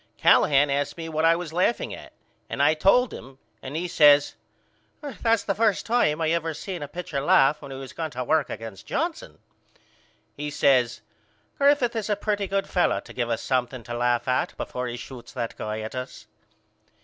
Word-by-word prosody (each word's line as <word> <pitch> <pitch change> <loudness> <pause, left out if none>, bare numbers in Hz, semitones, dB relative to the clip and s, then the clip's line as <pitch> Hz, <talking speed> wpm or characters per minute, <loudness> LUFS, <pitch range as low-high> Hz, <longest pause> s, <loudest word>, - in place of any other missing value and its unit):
Callahan 140 0 +4
asked 140 +3 -1
me 165 -1 -6
what 165 +1 +3
was 170 -3 -6
I - - -6
laughing 190 +6 +1
at - - -10 0.4
and - - 0
I 155 - +5
told 195 +11 +3
him 135 0 -11 0.2
and 135 +3 -7
he 175 +3 -2
says 145 -3 +5 0.7
That's 230 -6 0
the 200 - 0
first 215 -1 +1
time 220 -10 +2
I 160 -1 +1
ever 165 -1 -1
seen 185 -1 -6
a 145 - -4
pitcher 150 -2 -4
laugh 140 +1 +4
when 140 - -9
he 135 - -7
was 135 -1 -9
going 160 -1 -4
to 125 - -1
work 155 +3 +1
against 110 -4 -8
Johnson. 325 +2 -3 1.0
He 150 +1 -4
says 125 -4 +2 0.6
Griffith 280 -4 +3
is 220 -2 -3
a 210 - +2
pretty 205 -1 -2
good 195 0 -1
fellow 180 - +1
to - - -13
give 120 -2 -2
us 115 - -2
something 130 -1 -1
to 120 - -7
laugh 120 +1 0
at 125 0 0
before 125 0 -4
he 120 0 -5
shoots 120 0 -10
that 115 - -4
guy 110 0 -4
at 110 - -6
us. 125 0 -7
150 Hz, 195 wpm, -25 LUFS, 130-190 Hz, 1.0 s, I